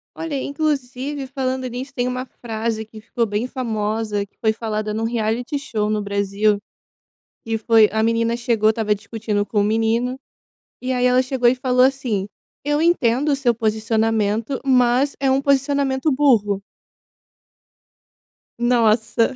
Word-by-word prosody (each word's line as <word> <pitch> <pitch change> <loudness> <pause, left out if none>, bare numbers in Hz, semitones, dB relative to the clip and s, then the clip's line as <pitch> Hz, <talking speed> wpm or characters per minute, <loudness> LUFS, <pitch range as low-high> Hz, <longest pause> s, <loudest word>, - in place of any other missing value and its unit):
Olha, 325 -3 -4
inclusive, 280 -1 -2
falando 260 -1 -3
nisso, 250 +3 -6
tem 250 -2 -1
uma 250 0 -2 0.2
frase 220 -1 -3
que 220 0 -13
ficou 230 +2 -1
bem 215 +3 -2
famosa, 215 -4 -2
que - - -44
foi 220 -1 +1
falada 215 -1 -3
num 220 +1 -1
reality 235 +4 -1
show 220 -7 -2
no 215 -1 0
Brasil, 200 +1 +1 0.9
e 225 0 -1
foi 220 -1 +5
a 220 0 +1
menina 230 +1 +1
chegou, 230 -2 +2
estava 215 -2 0
discutindo 210 0 -3
com 205 -1 0
o - - +2
menino, 225 +4 0 0.6
e 255 +1 -2
aí 250 -1 +1
ela 250 0 +4
chegou 255 -2 +1
e 245 - +4
falou 255 0 +3
assim: 245 -8 -1 0.4
"Eu 295 +1 +1
entendo 295 -5 +2
o 280 - +3
seu 245 -4 +1
posicionamento, 220 +1 0
mas 255 +1 +3
é 270 - +3
um 265 +1 +2
posicionamento 280 +1 +1
burro." 225 -8 +2 2.0
Nossa, 230 0 +2
235 Hz, 145 wpm, -21 LUFS, 220-260 Hz, 2.0 s, foi